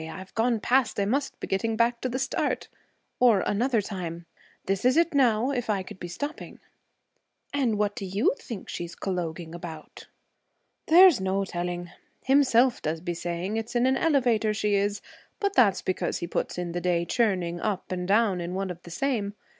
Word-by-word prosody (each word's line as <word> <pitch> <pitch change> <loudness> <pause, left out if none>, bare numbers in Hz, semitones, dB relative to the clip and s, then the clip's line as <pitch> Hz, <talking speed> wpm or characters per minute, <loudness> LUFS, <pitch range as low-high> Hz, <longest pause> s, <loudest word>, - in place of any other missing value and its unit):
"I've 185 +4 -9
gone 230 0 +1
past. 245 0 +2
I 200 - +2
must 275 +7 -1
be - - -4
getting 220 +4 -1
back 235 +1 +1
to 255 - -1
the 250 - -2
start." 270 - -1 0.5
Or, 230 -6 +5
another 235 +2 +1
time, 175 -4 -6 0.4
"This 195 0 -1
is 255 +4 +4
it, 340 0 +3
now. 250 -2 +3
If 245 -4 -3
I 200 -3 0
could 185 - -11
be 175 - -5
stopping!"' 285 - -6 0.9
'And 255 -7 +1
what 205 0 0
do 210 -5 -5
you 195 +7 +2
think 225 -5 -8
she 175 - -4
is 170 0 -10
colloguing 170 -3 -4
about?' 170 -2 -9 0.8
'There's 345 - +7
no 190 +1 0
telling. 175 -1 -4 0.3
Himself 260 -2 +4
does 160 +1 -2
be 175 +1 -3
saying 175 +5 -3
it's 225 +2 -5
in 240 +1 +3
an 260 0 +3
elevator 245 -8 +2
she 210 -1 0
is, 200 +1 0 0.4
but 400 -2 0
that's 200 - +4
because 185 - -1
he - - -4
puts 170 - -3
in 175 -1 -3
the 175 +1 -3
day 175 -1 +1
churning 180 -4 0
up 200 -3 -3
and 180 -1 -3
down 200 -3 +2
in 175 +1 -4
one 190 -1 -2
of 175 -1 -9
the 175 - -12
same. 210 0 -1
205 Hz, 190 wpm, -27 LUFS, 180-245 Hz, 0.9 s, There's